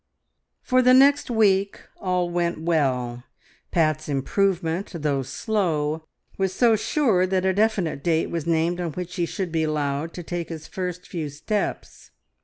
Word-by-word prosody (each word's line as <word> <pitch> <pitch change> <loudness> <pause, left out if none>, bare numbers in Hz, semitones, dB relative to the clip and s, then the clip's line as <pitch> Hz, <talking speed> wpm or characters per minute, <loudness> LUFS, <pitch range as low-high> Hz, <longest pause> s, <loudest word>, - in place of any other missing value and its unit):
For 255 0 +3
the 255 0 +6
next 280 +1 +5
week 200 -4 +2 0.2
all 180 -2 0
went 175 -1 -1
well. 130 -7 0 0.5
Pat's 155 -2 +1
improvement, 175 +5 0
though 145 -4 0
slow, 160 - -1 0.3
was 190 -1 0
so 235 0 +4
sure 215 -5 +2
that 185 0 0
a 190 - +3
definite 195 -9 0
date 165 -2 +1
was 170 -2 -3
named 170 +2 +1
on 170 -3 -3
which 180 +1 -6
he 170 -1 0
should 185 -2 -4
be 160 0 0
allowed 150 0 -1
to 175 - -6
take 175 0 -4
his 160 -2 -7
first 180 -3 -5
few 160 -4 -4
steps. 155 +9 -4
175 Hz, 155 wpm, -24 LUFS, 155-195 Hz, 0.5 s, the